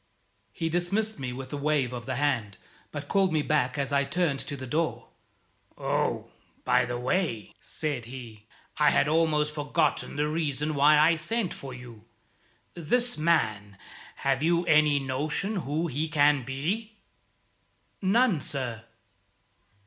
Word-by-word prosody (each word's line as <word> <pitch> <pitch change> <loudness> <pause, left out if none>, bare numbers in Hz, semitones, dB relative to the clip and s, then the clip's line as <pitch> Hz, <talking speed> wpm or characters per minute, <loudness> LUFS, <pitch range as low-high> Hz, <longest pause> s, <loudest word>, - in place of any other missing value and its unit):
He 165 +10 -3
dismissed 175 +5 0
me 130 -2 -3
with 130 +2 -7
a - - -2
wave 140 -3 0
of 120 0 -7
the 130 - -2
hand, 120 -8 -1 0.3
but - - -6
called 195 -2 +2
me 155 -2 +1
back 145 -3 +1
as 140 0 -1
I 140 0 +3
turned 140 0 0
to 145 - -6
the 130 - -7
door. 155 +5 -2 0.7
"Oh, - - -1 0.4
by - - +3
the 120 0 -3
way," 125 - -1
said 145 -7 -4
he, 115 -4 -10 0.3
"I 150 -1 +5
had 145 - +3
almost 150 -1 +2
forgotten 150 0 0
the 150 +1 0
reason 150 -1 -1
why 150 +1 +5
I 155 +3 +5
sent 180 +5 -1
for 135 - -9
you. 120 -3 -11 0.7
This 240 +9 +1
man 110 - 0 0.5
have 135 0 +2
you 170 +2 +2
any 155 -2 +4
notion 150 +10 -1
who 155 0 -1
he 155 +1 -2
can 145 -2 +4
be?" 180 - -3 1.1
"None, 200 - +3
sir." 120 -5 -3
150 Hz, 145 wpm, -27 LUFS, 130-165 Hz, 1.1 s, I